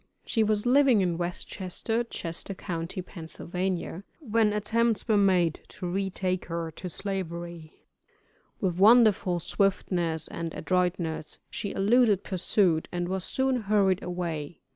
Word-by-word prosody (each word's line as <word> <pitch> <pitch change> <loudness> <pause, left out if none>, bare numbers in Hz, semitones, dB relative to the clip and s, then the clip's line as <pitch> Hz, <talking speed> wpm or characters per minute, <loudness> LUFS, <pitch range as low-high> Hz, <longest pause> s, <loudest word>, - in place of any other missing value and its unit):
She 225 - +1
was 215 0 +1
living 255 -3 +5
in 175 -2 0
West 175 0 -2
Chester, 225 +5 -2
Chester 190 -3 -5
county, 170 +1 -4
Pa., 180 -1 -10 1.0
when 225 -6 +2
attempts 225 +1 +1
were 220 - +3
made 185 -5 +3
to - - -8
retake 185 0 -1
her 165 -1 -4
to 180 +3 -7
Slavery. 170 -4 -5 0.7
With 180 -3 -1
wonderful 210 -4 +5
swiftness 175 -3 0
and 165 -1 -5
adroitness 175 -4 -1
she 200 - -4
eluded 210 0 +3
pursuit, 185 -3 +1
and 175 0 -2
was 190 -1 -2
soon 265 +3 0
hurried 200 -4 +2
away. 170 -4 -4
185 Hz, 125 wpm, -28 LUFS, 170-210 Hz, 1.0 s, living